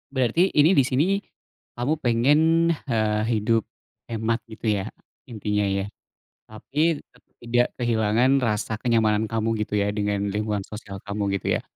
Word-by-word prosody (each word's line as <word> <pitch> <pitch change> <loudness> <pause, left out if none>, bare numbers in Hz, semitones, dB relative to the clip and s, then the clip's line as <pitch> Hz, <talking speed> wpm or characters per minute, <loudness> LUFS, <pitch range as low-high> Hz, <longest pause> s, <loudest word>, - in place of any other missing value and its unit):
Berarti 130 - +2
ini 155 +6 +4
disini 150 +9 +2 0.5
kamu 125 +6 0
pengen, 120 +5 +3 0.5
eee, 110 -1 +1
hidup 110 0 +1 0.5
hemat, 115 0 -1
gitu 110 +1 -6
ya, 105 -3 +1 0.4
intinya, 105 -3 -1
ya? 100 0 0 0.6
Tapi 145 +8 -1
tetap - - -27 0.2
tidak 120 +1 +2
kehilangan 115 0 +2
rasa 110 -2 -1
kenyamanan 110 -3 +2
kamu, 115 0 -1
gitu 105 0 -2
ya, 100 0 +1
dengan 100 -1 -1
lingkungan 105 -1 -2
sosial 100 -2 -9
kamu, 100 -1 -1
gitu - - -4
ya? - - -18
110 Hz, 140 wpm, -24 LUFS, 105-125 Hz, 0.6 s, ini